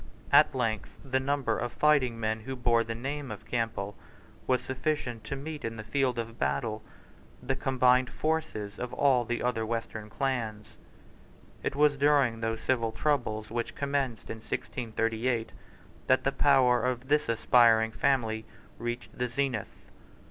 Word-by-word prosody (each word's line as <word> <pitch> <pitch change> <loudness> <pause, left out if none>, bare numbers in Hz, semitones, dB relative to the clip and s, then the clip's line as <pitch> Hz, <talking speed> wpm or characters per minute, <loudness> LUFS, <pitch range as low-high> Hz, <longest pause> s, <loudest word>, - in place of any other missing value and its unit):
At - - +6
length 110 -2 -2
the 130 0 +1
number 135 -4 0
of 120 0 -2
fighting 135 -6 +2
men 110 0 -1
who 130 +4 -6
bore 120 -2 +2
the 115 0 -4
name 140 +3 -4
of 105 -2 -8
Campbell 115 -4 -2 0.5
was 130 -1 +2
sufficient 130 -4 -2
to 140 - -3
meet 150 +2 -6
in 115 0 -3
the 110 - -7
field 125 +2 0
of 115 0 -5
battle 70 +11 -1 0.6
the 135 +1 0
combined 130 -1 +3
forces 155 -10 -2
of 125 -1 -4
all 130 -4 +3
the 120 0 -2
other 120 -2 0
western 110 -1 -4
clans, 115 -4 -3 0.9
It - - -2
was 145 0 +4
during 140 -5 +3
those 115 0 -2
civil 115 -3 +1
troubles 110 -7 -1
which 120 0 -3
commenced 140 -4 -2
in 110 - -5
1638 115 +1 -2 0.6
that - - +4
the - - +2
power 125 -2 +4
of 125 0 -1
this 150 -1 +2
aspiring 115 -1 +4
family 110 -2 0 0.3
reached 120 +1 -5
the 125 - -1
zenith. 125 -3 -3
120 Hz, 150 wpm, -29 LUFS, 115-135 Hz, 0.9 s, At